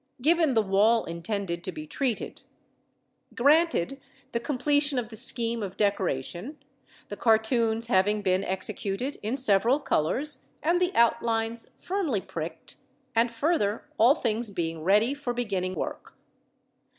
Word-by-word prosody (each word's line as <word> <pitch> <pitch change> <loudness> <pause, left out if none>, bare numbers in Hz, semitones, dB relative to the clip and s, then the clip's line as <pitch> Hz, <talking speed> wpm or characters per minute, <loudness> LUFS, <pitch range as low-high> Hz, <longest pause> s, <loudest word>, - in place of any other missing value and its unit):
Given 315 0 +3
the 220 - +4
wall 210 +4 +3
intended 170 +1 -4
to 185 - -4
be 155 -3 -7
treated: 245 - -3 0.9
granted 280 - +2 0.3
the 235 - -1
completion 290 +2 +1
of 235 -3 -2
the 225 - -9
scheme 230 +1 +1
of 195 -2 -5
decoration, 195 - -1 0.5
the - - -5
cartoons 225 0 +2
having 210 -1 +2
been 185 0 +2
executed 200 +7 -3
in 225 +6 -2
several 240 +2 +3
colours 280 - -1 0.2
and 345 +3 +2
the 360 0 +2
outlines 230 0 +1
firmly 355 - -1
pricked, 165 -2 -7 0.4
and 230 +1 +3
further, 230 -4 0
all 240 +6 +6
things 230 -5 -2
being 165 -4 -3
ready 210 - +3
for 285 -4 -4
beginning 190 -6 -2
work. - - -6
225 Hz, 130 wpm, -27 LUFS, 195-260 Hz, 0.9 s, all